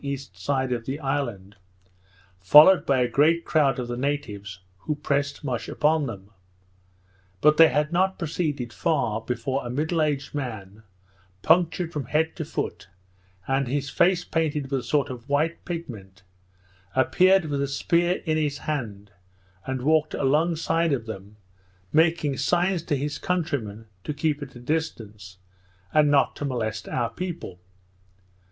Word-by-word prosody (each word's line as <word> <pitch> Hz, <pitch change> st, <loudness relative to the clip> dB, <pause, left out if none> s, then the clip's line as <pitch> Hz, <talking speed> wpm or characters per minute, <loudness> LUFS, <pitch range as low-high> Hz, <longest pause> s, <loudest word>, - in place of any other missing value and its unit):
E. 140 Hz, 0 st, -2 dB
side 130 Hz, +2 st, -3 dB
of 120 Hz, -2 st, -2 dB
the 135 Hz, +3 st, -3 dB
island, 120 Hz, -9 st, -3 dB, 0.8 s
followed 150 Hz, -, +7 dB
by 135 Hz, -2 st, +3 dB
a 125 Hz, -, +2 dB
great 155 Hz, +7 st, +2 dB
crowd 140 Hz, -5 st, +2 dB
of 125 Hz, -2 st, -4 dB
the 120 Hz, -, -3 dB
natives, 105 Hz, -8 st, -4 dB, 0.2 s
who 150 Hz, -, -3 dB
pressed 145 Hz, 0 st, -2 dB
much 125 Hz, -5 st, -3 dB
upon 150 Hz, -1 st, +1 dB
them. 100 Hz, -3 st, -9 dB, 1.1 s
But 150 Hz, +7 st, +4 dB
they 165 Hz, -, +9 dB
had 150 Hz, +1 st, 0 dB
not 190 Hz, +2 st, +2 dB
proceeded 150 Hz, -7 st, -3 dB
far, 120 Hz, -9 st, 0 dB
before 125 Hz, +4 st, -2 dB
a 120 Hz, -, -5 dB
middle 155 Hz, +6 st, 0 dB
aged 145 Hz, -3 st, -1 dB
man, 110 Hz, -7 st, -6 dB, 0.6 s
punctured 170 Hz, 0 st, +2 dB
from 145 Hz, -4 st, -3 dB
head 160 Hz, +6 st, 0 dB
to 160 Hz, -, -3 dB
foot, 155 Hz, -, -4 dB, 0.6 s
and 135 Hz, 0 st, +1 dB
his 140 Hz, +2 st, -2 dB
face 175 Hz, 0 st, +3 dB
painted 150 Hz, -4 st, -1 dB
with 135 Hz, -, +1 dB
a -, -, -8 dB
sort 145 Hz, -2 st, 0 dB
of 125 Hz, +1 st, -10 dB
white 155 Hz, +4 st, 0 dB
pigment, 105 Hz, -, -7 dB, 0.7 s
appeared 185 Hz, +7 st, +4 dB
with 145 Hz, -2 st, -2 dB
a 140 Hz, -, 0 dB
spear 170 Hz, +5 st, 0 dB
in 155 Hz, -1 st, +1 dB
his 145 Hz, -2 st, -1 dB
hand, 105 Hz, -10 st, -5 dB, 0.6 s
and 130 Hz, -1 st, -3 dB
walked 155 Hz, +1 st, +2 dB
along 150 Hz, +5 st, +2 dB
side 165 Hz, 0 st, +1 dB
of 120 Hz, -5 st, -2 dB
them, 105 Hz, -2 st, -8 dB, 0.6 s
making 160 Hz, -3 st, +2 dB
signs 180 Hz, 0 st, +1 dB
to 155 Hz, -3 st, -1 dB
his 145 Hz, +2 st, -3 dB
countrymen 135 Hz, -, -2 dB, 0.2 s
to 150 Hz, -, -4 dB
keep 150 Hz, 0 st, -1 dB
at 135 Hz, -3 st, -8 dB
a -, -, -9 dB
distance, 110 Hz, -, -4 dB, 0.6 s
and 150 Hz, -1 st, +4 dB
not 145 Hz, -1 st, +3 dB
to -, -, -5 dB
molest 115 Hz, -5 st, -3 dB
our 120 Hz, -2 st, -1 dB
people. 170 Hz, -, -6 dB
145 Hz, 155 wpm, -25 LUFS, 120-160 Hz, 1.1 s, they